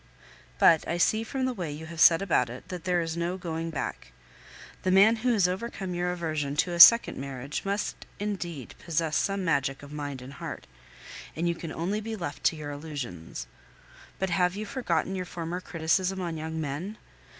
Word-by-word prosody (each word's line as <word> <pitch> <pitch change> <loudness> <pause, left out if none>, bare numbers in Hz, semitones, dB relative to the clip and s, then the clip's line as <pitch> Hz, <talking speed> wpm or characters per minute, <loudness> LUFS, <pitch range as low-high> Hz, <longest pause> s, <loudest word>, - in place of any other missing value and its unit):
But 165 -2 +5
I 170 - -1
see 220 +5 +2
from 260 +3 -2
the 260 - 0
way 175 -9 -4
you 150 +2 -7
have 165 0 -9
set 165 +2 +7
about 145 -10 +2
it 125 +2 -10
that 180 -2 -6
there 180 -1 +2
is 165 -1 -3
no 170 +2 -2
going 165 -2 -4
back. 140 - -5 0.7
The 185 - 0
man 200 +5 +6
who 245 +3 +1
has 205 -6 +4
overcome 190 -1 -4
your 175 0 0
aversion 155 -5 -2
to 175 +4 +1
a 170 - -3
second 230 - +9
marriage 135 +1 -5
must 200 +1 -3
indeed 175 - -4
possess 165 -2 0
some 195 -1 0
magic 140 -4 0
of 145 +1 -10
mind 145 -3 -5
and 135 +2 -10
heart; - - -7 0.7
and 170 +2 -1
you 170 - +2
can 165 -1 -7
only 195 +7 -2
be 220 +1 -4
left 170 -7 -6
to - - +4
your 150 -2 -6
illusions. 130 - -6 0.7
But 190 -1 -1
have 180 +1 +2
you 215 +1 -4
forgotten 190 - -1
your 185 -1 -3
former 175 +1 -5
criticism 180 +3 0
on 170 -3 -3
young 160 +1 -4
men? 160 +8 -4
170 Hz, 195 wpm, -28 LUFS, 150-190 Hz, 0.7 s, second